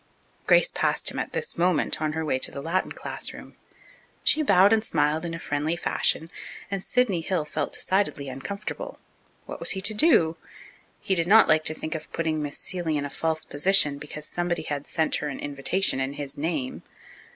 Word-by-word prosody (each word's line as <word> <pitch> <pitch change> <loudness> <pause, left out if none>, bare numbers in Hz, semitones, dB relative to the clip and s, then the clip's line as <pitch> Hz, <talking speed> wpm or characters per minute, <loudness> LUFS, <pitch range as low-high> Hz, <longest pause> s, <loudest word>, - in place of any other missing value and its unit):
Grace - - +5
passed - - +1
him - - -5
at - - -3
this 470 - -3
moment 175 -3 +2
on 155 -1 0
her 160 0 -2
way 130 -4 0
to - - +1
the - - -7
Latin 170 +6 -1
classroom. - - -6 0.7
She 310 - +5
bowed 200 -6 +5
and 220 -1 +2
smiled 155 -5 +1
in 165 -1 -4
a - - -7
friendly 150 +2 -1
fashion 165 -1 0 0.4
and 195 -1 -3
Sidney 230 -9 +1
Hill 165 -2 -1
felt 150 -1 -3
decidedly 190 -7 0
uncomfortable. 200 +11 -6 0.5
What - - -7
was - - +2
he - - -1
to 205 +3 +3
do? 190 - +4 0.6
He 195 - 0
did 170 -2 +1
not 220 +4 +7
like 155 0 +4
to 155 - +2
think 155 - -5
of 160 - -7
putting 160 -2 -1
Miss 145 -1 -4
Seeley 170 -4 -3
in 145 - -2
a 140 - -6
false 160 -1 -2
position 150 -1 +2
because 150 +1 -8
somebody 175 0 -2
had 145 -2 -4
sent 160 -2 +1
her - - -3
an 145 - -5
invitation 145 +4 +1
in 135 +1 -2
his 145 -1 -6
name. 150 -4 -3
160 Hz, 195 wpm, -26 LUFS, 150-185 Hz, 0.7 s, not